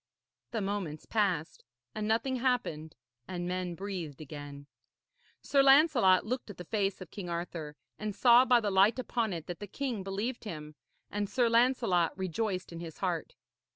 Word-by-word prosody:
The 225 - -2
moments 195 -6 -3
passed 190 -8 0 0.3
and 215 -1 -3
nothing 245 +4 +1
happened, 215 - -1 0.3
and 175 -1 -4
men 180 -1 -2
breathed 180 -7 -5
again. 145 -1 -8 0.8
Sir 280 - +4
Lancelot 270 - +6
looked 250 +1 -3
at 205 - -9
the 180 - -8
face 195 -1 -1
of 185 - -9
King 185 -4 -6
Arthur, 170 -3 -4 0.2
and 210 -1 -3
saw 245 +1 +7
by 250 -2 +5
the 205 -2 -1
light 195 +5 +5
upon 235 -3 -1
it 165 -3 -5
that 175 - -6
the 205 - -6
king 250 -1 -3
believed 205 +6 -3
him; 155 -7 -7 0.4
and 205 -1 -2
Sir 245 -2 +2
Lancelot 230 -8 +3
rejoiced 190 +1 -2
in 170 - -7
his 165 -2 -8
heart. 175 -4 -2
195 Hz, 165 wpm, -31 LUFS, 170-230 Hz, 0.8 s, saw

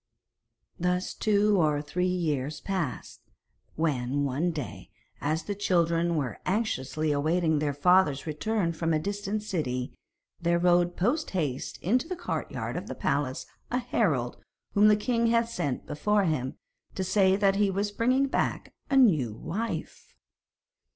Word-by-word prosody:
Thus 180 +1 0
two 210 -2 +3
or 150 -2 +2
three 155 +5 -1
years 155 -6 -1
passed, 185 -9 -4 0.5
when, 145 -3 0
one 140 +6 0
day, 150 -7 -6 0.3
as 155 +3 0
the 205 - -3
children 170 -4 +1
were 135 -8 -2
anxiously 155 - 0
awaiting 160 +2 +1
their 145 -2 -1
father's 155 -3 +3
return 170 +3 -1
from 165 0 0
a - - +1
distant 205 +4 -3
city, 130 -11 -2 0.5
there 170 0 +2
rode 175 0 +3
post 255 - +1
haste 140 -6 -2
into 245 - +2
the 365 - -3
courtyard 350 0 -4
of - - -5
the - - -5
palace 140 -3 -1 0.2
a 250 - 0
herald 165 - 0 0.4
whom 205 +1 +6
the 210 - +6
king 230 +2 +1
had 230 0 +3
sent 170 - -3
before 205 +7 +1
him, 140 -7 -1 0.4
to 190 - -1
say 190 0 +3
that 195 -1 +2
he 205 -1 +3
was 200 +2 -1
bringing 255 +6 +2
back 270 - -2 0.2
a 275 - +3
new 160 - +4
wife. 175 - -5
175 Hz, 145 wpm, -28 LUFS, 150-205 Hz, 0.5 s, whom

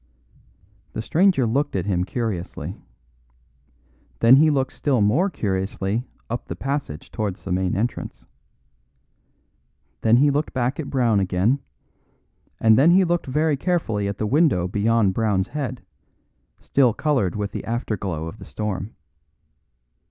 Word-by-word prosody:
The - - -3
stranger 165 - +3
looked 140 +4 0
at 95 -2 -1
him 90 -3 0
curiously. 100 -4 -4 1.4
Then 120 +3 +7
he 155 +2 +5
looked 135 -3 0
still 135 -5 0
more 125 - +3
curiously 100 - -2 0.2
up 120 +1 -5
the - - -5
passage 135 - -4
towards 105 -5 -4
the 95 - -5
main 90 0 0
entrance. 110 +5 -3 1.8
Then 115 +1 +4
he 145 +3 +4
looked 145 +2 -1
back 130 +3 -1
at 150 - -4
Brown 120 -6 +2
again, 95 +8 +1 1.0
and 110 +1 +5
then 150 +5 +6
he 185 +2 +6
looked 175 -2 -1
very 150 +3 +1
carefully 130 - -1
at 100 0 -4
the 110 - -2
window 130 - +2
beyond 105 +1 +2
Brown's 100 -3 0
head, 130 -6 -4 0.8
still 125 -5 +2
coloured 135 - 0
with 105 -1 -3
the - - -5
after 115 -1 -2
glow 85 -5 -4
of 90 +7 -8
the - - -10
storm. 105 0 -4
115 Hz, 140 wpm, -23 LUFS, 100-140 Hz, 1.8 s, Then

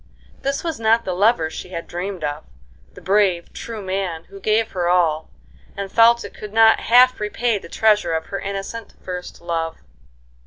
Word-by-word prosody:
This 275 0 -2
was 325 -7 -3
not 225 +1 +3
the 185 - -2
lover 200 -2 +3
she - - -7
had 170 -2 -5
dreamed 180 0 -5
of, 150 +1 -3 0.5
the - - -12
brave, 190 -3 +1
true 225 -3 -7
man 185 -4 -3
who 195 0 -11
gave 220 +3 +1
her 175 -2 -1
all, 165 -3 +2 0.5
and 200 -1 -5
felt 235 0 +5
it 200 - -9
could 210 -1 -9
not 225 0 +6
half 250 +2 +5
repay 210 +1 0
the 170 - -12
treasure 210 -6 +2
of 160 0 -2
her 195 - -1
innocent, 200 +3 -6
first 180 -2 -7
love. 165 -1 -3
195 Hz, 180 wpm, -21 LUFS, 175-225 Hz, 0.5 s, not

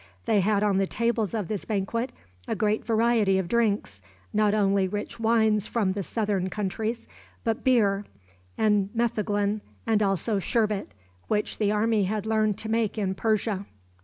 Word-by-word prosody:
They 210 - +3
had 205 +1 +2
on 200 -2 +2
the 195 - +1
tables 230 -1 0
of 210 -5 -2
this 210 -3 -3
banquet 230 +4 -2 0.4
a - - -1
great 215 0 0
variety 225 -3 +2
of 190 -2 -1
drinks 205 - 0 0.3
not 210 0 +3
only 195 -2 +2
rich 205 +4 -5
wines 220 -2 +2
from 210 -5 0
the 200 - -3
southern 200 -2 -1
countries, 215 +4 -3 0.4
but 225 +1 -1
beer, 205 -6 +3 0.5
and 210 -2 +2
metheglin, 210 -3 0 0.2
and 220 -2 +2
also 195 +1 +1
sherbet, 210 - -1 0.3
which 210 -1 -1
the 210 -2 +2
army 215 -1 +2
had 210 +2 -2
learned 215 -2 +1
to 220 - -5
make 225 -1 0
in 195 -3 0
Persia. 210 -1 -1
210 Hz, 160 wpm, -26 LUFS, 200-225 Hz, 0.5 s, They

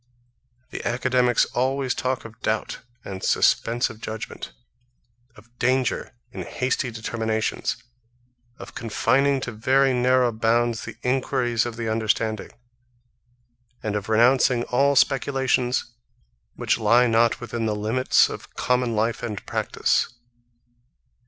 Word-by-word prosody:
The - - -6
academics 125 0 +2
always 130 +1 0
talk 130 -1 -2
of 115 0 -12
doubt 110 0 -2 0.3
and 95 -1 -7
suspense 120 +3 +2
of 115 -1 -11
judgement, 110 0 -6 0.8
of 120 +2 -19
danger 130 0 0 0.2
in - - -7
hasty 130 0 -2
determinations, 110 -1 -2 0.8
of - - -11
confining 135 +5 +1
to 120 - -4
very 130 +4 +2
narrow 125 0 +3
bounds 115 +1 0
the - - -8
enquiries 125 -2 0
of 120 - -6
the 115 -1 -4
understanding, 110 -1 -1 1.3
and 105 -1 -2
of 105 0 -4
renouncing 120 +2 +4
all 140 +3 +3
speculations 130 -2 +1 0.6
which - - 0
lie 115 +3 +4
not 115 0 +2
within 120 -2 -3
the 105 - -1
limits 110 +5 +3
of - - -10
common 125 -2 0
life 115 +1 0
and 110 -4 -5
practice. - - 0
120 Hz, 120 wpm, -24 LUFS, 110-130 Hz, 1.3 s, renouncing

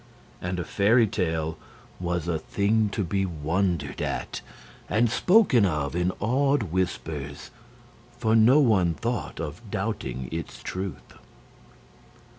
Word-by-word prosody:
And 90 0 -3
a - - -1
fairy 110 +6 +4
tale 80 -6 -2 0.4
was 85 -2 -2
a 80 -2 0
thing 105 +5 +1
to 100 +1 -2
be 95 +3 0
wondered 85 0 -1
at - - -3 0.5
and 115 +1 +2
spoken 180 - +5
of 75 -5 0
in 90 +1 +1
awed 135 +4 +2
whispers; 80 - -3 0.7
for 110 -2 +2
no 120 +6 +6
one 95 - +3
thought 120 +5 -3
of 80 +3 -5
doubting 100 - -3
its 80 0 -6
truth. 95 0 -5
95 Hz, 120 wpm, -26 LUFS, 85-110 Hz, 0.7 s, no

